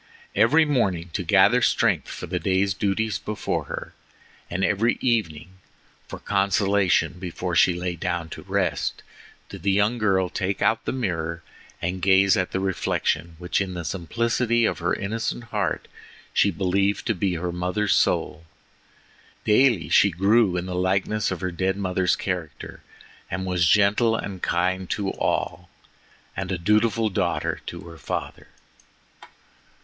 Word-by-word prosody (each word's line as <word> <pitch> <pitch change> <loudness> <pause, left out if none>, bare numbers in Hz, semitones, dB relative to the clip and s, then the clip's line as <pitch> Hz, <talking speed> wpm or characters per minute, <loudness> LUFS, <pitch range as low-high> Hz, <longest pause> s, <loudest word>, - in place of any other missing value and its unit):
Every 130 +10 +4
morning, 95 - 0
to - - -1
gather 100 +7 +4
strength 105 -8 +2
for - - -7
the 90 +1 -3
day's 95 +1 +1
duties 100 +1 -1
before 105 - -3
her, - - -7 0.6
and 95 +2 0
every 110 +3 +1
evening, 95 - -1 0.5
for - - -7
consolation 95 -3 +1
before 90 -2 -4
she 90 - +4
lay 90 0 -3
down 85 -2 -2
to - - -8
rest, - - -2 0.5
did 95 - -9
the 100 - 0
young 105 +5 +2
girl 95 -3 +2
take 95 +2 -2
out 110 +2 +1
the - - -1
mirror 85 -9 -3 0.4
and 90 +1 -2
gaze 95 +1 +5
at 95 -3 0
the 95 - -1
reflection 85 -3 -1
which 90 +3 -1
in 95 -2 -3
the 85 -2 -5
simplicity 115 +7 0
of - - -1
her 85 +1 0
innocent 110 +3 -3
heart - - -1 0.5
she 100 - +4
believed 100 +2 0
to 115 - +1
be 95 -2 -1
her 90 +1 -3
mother's 90 +4 0
soul. 80 - 0 1.0
Daily 105 - +3
she 100 +5 +5
grew 95 +2 +3
in 90 - -2
the 90 - -5
likeness 95 +3 0
of 95 -2 -4
her 95 -1 -2
dead 95 +2 -1
mother's 90 -2 +1
character, 90 -6 -5 0.5
and 95 +1 -3
was 90 -2 +1
gentle 105 +4 +4
and 100 -4 -5
kind 90 +1 0
to 100 -2 -1
all, 85 +2 -2 0.7
and 95 0 -4
a 95 - -1
dutiful 110 +5 +2
daughter 95 -3 -1
to - - -6
her 85 -1 -12
father. - - -5
95 Hz, 150 wpm, -24 LUFS, 90-105 Hz, 1.0 s, gaze